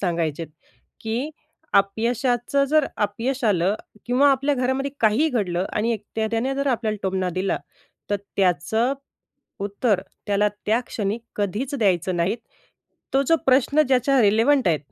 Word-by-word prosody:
सांगायचे 165 -4 -1 0.6
की, 235 +7 -2 0.4
"अपयशाचं 240 +6 +1
जर 305 -1 +3 0.2
अपयश 245 +6 -3
आलं 195 -2 +2 0.3
किंवा 260 +4 +4
आपल्या 275 +2 +2
घरामध्ये 260 +2 -1
काहीही 230 +8 +3
घडलं 190 - -1
आणि 225 +2 +1
एक 215 -2 -5
त्याने 225 +4 0
जर 280 +1 -2
आपल्याला 230 -5 0
टोमणा 190 -1 0
दिला, 185 +2 -1 0.5
तर 205 - +2 0.2
त्याचं 195 - +2 0.7
उत्तर 205 -1 0 0.3
त्याला 205 0 +2 0.2
त्या 220 +3 +3
क्षणी 210 +1 -2 0.2
कधीच 215 +8 -2
द्यायचं 185 - +1
नाही. 180 +6 +1 0.8
तो 270 - +4
जो 330 - +5
प्रश्न 270 +3 +4
ज्याच्या 265 +1 +3
रिलेव्हंट 225 +4 +4
आहे, 160 -3 +2
225 Hz, 135 wpm, -23 LUFS, 195-265 Hz, 0.8 s, जो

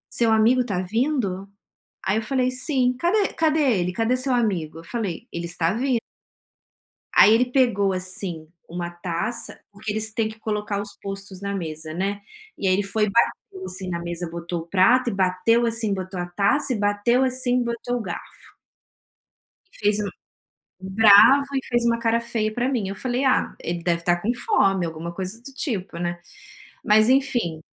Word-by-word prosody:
"Seu 230 -2 +3
amigo 225 +4 +4
está 200 -7 -2
vindo?", 200 -1 -1 0.5
aí 190 - 0
eu 220 - 0
falei: 255 +1 0
"Sim!", 255 -1 +1
"Cadê 385 +8 +1
cadê 315 -1 +2 0.2
ele, 180 +1 -2
cadê 225 +5 +1
seu 255 +1 0
amigo?", 185 -10 -1
Eu 165 - -11
falei: 225 +1 -4
"Ele 170 - -5
está 170 +1 -1
vin" 250 +1 +1 1.2
Aí 215 - +8
ele 240 +3 +4
pegou, 215 -7 +2
assim, 185 -3 -3 0.2
uma 175 +1 -4
taça 175 +6 -4
porque 205 +1 -5
eles 215 +1 -2
têm 220 0 0
que 220 0 -12
colocar 210 -2 -2
os 205 0 -8
postos 195 -1 -7
na 200 0 -3
mesa, 155 -4 -5
né, 195 +4 -2 0.4
e 195 - -1
aí 185 - +4
ele 200 +2 +1
foi 200 +2 -1
e 210 - +2
bateu, 190 -3 0
assim, 185 +1 -6
na 170 -1 -3
mesa, 170 0 -4
botou 170 0 -5
o 165 - -12
prato 235 +8 +4
e - - -3
bateu, 195 +5 +2
assim, 225 -2 0
botou 185 -1 -5
a 175 - -2
taça 200 +10 +1
e 220 - -3
bateu, 205 +5 +2
assim, 255 -1 +1
botou 235 +1 -3
o - - -3
garfo. 185 -5 -9 1.2
E - - -19
fez 210 0 +1
um 205 -1 -2 0.7
bravo 210 +8 +6
e 270 - -2
fez 240 -1 0
uma 230 0 +2
cara 230 0 +1
feia 225 -2 -2
pra 245 +3 -1
mim, 235 -8 -1
eu 195 - -4
falei: 255 +3 -2
"Ah, 260 - +2
ele 170 0 -4
deve 170 -1 0
estar 175 0 +1
com 220 +6 0
fome", 195 - +2
alguma 165 +1 -6
coisa 190 +4 -4
do 275 +3 -11
tipo, 205 - -4
né. 175 0 -3 0.6
Mas, 215 +1 +5
enfim, 245 - +1
210 Hz, 185 wpm, -23 LUFS, 185-240 Hz, 1.2 s, Aí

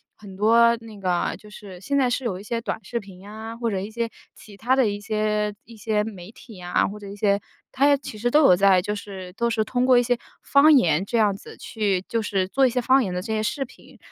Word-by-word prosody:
很 200 -3 -12
多 230 +3 +4
那 220 -2 -12
个 180 -2 -1
就 210 - -16
是 200 -3 -11
现 280 +9 -1
在 260 -3 +3
是 250 +1 -2
有 195 -6 -2
一 - - -10
些 230 +2 -3
短 - - -4
视 235 +5 -3
频 195 -4 -13
呀， 220 +3 -9
或 235 -1 -1
者 195 - -1
一 195 +3 -5
些 230 +1 -2 0.3
其 205 -2 -15
他 245 +5 +1
的 260 -4 +3
一 205 0 -4
些 210 0 -1
一 230 -1 -14
些 210 -1 0
媒 195 -4 -8
体 225 -4 -14
啊， 175 0 +1
或 210 +2 -8
者 205 - -10
一 200 - -8
些 200 -1 +1 0.3
它 275 +2 +2
也 285 -1 +5
其 255 -5 -9
实 240 +3 0
都 300 +5 +4
有 180 - +7
在， 195 -1 +5
就 205 +3 -3
是 195 -3 -8
都 235 +4 -1
是 225 -1 0
通 245 +3 -1
过 255 -1 +5
一 245 - +4
些 245 0 +1 0.2
方 290 +2 +5
言 175 - +3
这 235 - -1
样 210 -3 +3
子 - - -12
去 200 -4 -1
就 230 - 0
是 195 -3 -1
做 265 +5 +3
一 - - +1
些 250 +1 -1
方 260 +3 +4
言 190 -5 -3
的 180 - -2
这 220 +4 -6
些 215 - 0
视 270 +6 -2
频， 255 - -16
215 Hz, 285 characters per minute, -23 LUFS, 200-235 Hz, 0.3 s, 有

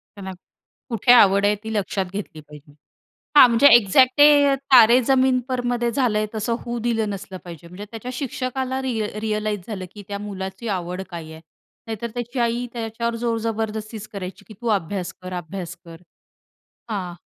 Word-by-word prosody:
त्याला 195 -2 -7 0.6
कुठे 230 +1 +2
आवड 200 -4 +6
आहे 210 +1 +3
ती 220 0 -5
लक्षात 195 -2 -1
घेतली 190 -6 -6
पाहिजे. 150 0 -15 0.6
हां 260 - +11
म्हणजे 235 +4 +4
एक्झॅक्ट 250 +4 +4
ते 290 -1 +6 0.2
तारे 240 0 +8
जमीन 260 0 +3
पर 255 -1 -1
मध्ये 240 -1 0
झालंय 220 -5 +1
तसं 220 +2 -2
होऊ 240 0 -3
दिलं 225 -3 0
नसलं 195 -1 -7
पाहिजे 170 -1 -10
म्हणजे 185 +4 -9
त्याच्या 230 +2 -7
शिक्षकाला 260 0 -3
रिअ 230 -5 -1
रिअलाईज 215 -2 -2
झालं, 195 -4 -5
की 205 - -9
त्या 200 0 -4
मुलाची 195 +2 -6
आवड 180 -1 -3
काय 165 -3 -8
आहे? 160 - -11 0.5
नाहीतर 225 +1 -5
त्याची 240 +1 -5
आई 235 +1 0
त्याच्यावर 230 0 -3
जोर 230 -1 -1
जबरदस्ती 220 0 -3
करायची, 200 +1 -7
की 215 - -11
तू 240 - -3
अभ्यास 185 +1 -5
कर, 185 - -7
अभ्यास 175 0 -6
कर. 165 -1 -11 0.9
हां 185 -4 -4
215 Hz, 165 wpm, -22 LUFS, 190-240 Hz, 0.9 s, हां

